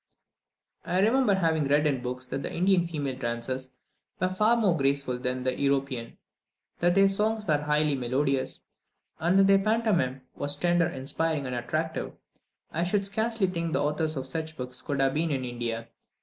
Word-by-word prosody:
I 180 - -1
remember 225 +1 +4
having 160 -5 +1
read 145 +2 +3
in 135 -4 +1
books 125 +1 -5
that 135 +2 -4
the - - -4
Indian 180 0 +2
female 140 -6 -4
dancers 130 +2 -3 0.4
were 185 - +1
far 215 +5 +3
more 200 -7 +3
graceful 140 -3 0
than 125 0 -2
the 130 0 -1
European, 135 -4 -1 0.6
that 175 +1 +3
their 195 0 +6
songs 210 +2 0
were 150 -6 +2
highly 150 0 +1
melodious, 135 +1 0 0.6
and 175 +4 +2
that 195 - +6
their 195 0 +5
pantomime 195 - +1
was 145 0 -1
tender, 175 +2 +2
inspiring, 150 0 -1
and 125 - -4
attractive. 155 +6 -3 0.6
I 165 - -1
should 195 +3 0
scarcely 220 +1 0
think 170 -3 -2
the - - +1
authors 155 +1 0
of 135 -1 -3
such 160 +3 -4
books 125 0 -4
could 140 -2 -3
have 135 0 +2
been 160 +2 0
in 135 -3 -1
India! 115 -1 -4
150 Hz, 175 wpm, -27 LUFS, 130-180 Hz, 0.6 s, their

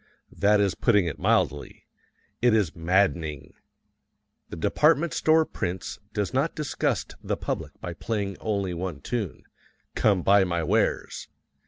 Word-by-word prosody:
That 105 +1 +3
is 100 -2 +2
putting 105 -6 +3
it 80 - -4
mildly. - - 0 0.6
It 120 -2 +4
is 100 -7 +1
maddening. 80 -4 0 1.0
The - - -6
department 155 - +2
store 160 0 +3
prince 90 - -4
does 105 +3 -2
not 140 +5 0
disgust 150 -3 -2
the - - -2
public - - -5
by 90 - -5
playing 100 0 -3
only 100 -4 -1
the 85 - -5
one 85 -5 -4
tune, 110 -4 -4 0.5
"Come 100 -5 +2
Buy 100 0 +5
My 85 -2 -1
Wares!" - - 0
100 Hz, 140 wpm, -26 LUFS, 85-110 Hz, 1.0 s, Buy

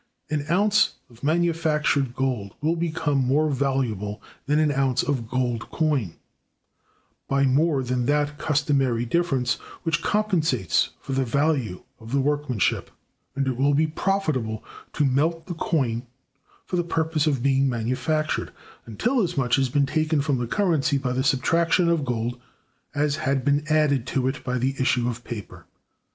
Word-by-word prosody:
An 150 -1 -1
ounce 205 +4 +3 0.2
of 115 +2 -19
manufactured 155 -5 +1
gold 125 -7 -2
will 160 +3 +1
become 160 -4 0
more 145 +4 +2
valuable 125 -7 -1 0.3
than 150 +1 +2
an 155 -1 +3
ounce 135 -3 +1
of 125 -6 -2
gold 120 -2 -1
coin, 145 - 0 1.1
by 140 0 +2
more 140 +1 +2
than 125 -1 -1
that 145 0 0
customary 135 -6 +1
difference 130 -4 +1 0.3
which 165 -2 0
compensates 165 - +1
for - - -8
the 135 0 +1
value 130 - 0 0.2
of 115 +3 -10
the 140 - +3
workmanship; 145 -6 0 0.5
and 135 0 0
it 130 -2 -1
will 140 +2 +3
be 155 +2 +3
profitable 155 - -1 0.3
to 150 - +1
melt 155 +5 +1
the 180 - -5
coin 130 -8 -1 0.6
for 180 - -2
the 175 - +1
purpose 160 -2 0
of 135 -5 0
being 135 0 +3
manufactured, 130 +6 -1 0.4
until 235 - 0
as 180 - -2
much 125 -3 +2
has 135 -1 +1
been 140 +2 +2
taken 155 +2 0
from 140 -2 0
the 120 - -2
currency 155 - +1
by 135 -2 -2
the 130 +1 0
subtraction 165 +6 +2
of 165 -3 +1
gold 120 0 -2 0.5
as 145 0 +1
had 135 -4 -1
been 145 +1 +2
added 145 -5 +2
to 130 -1 0
it 135 +2 -3
by 125 0 -1
the 130 +2 0
issue 125 -2 +2
of 120 0 -4
paper. 115 -5 -8
140 Hz, 160 wpm, -24 LUFS, 125-155 Hz, 1.1 s, ounce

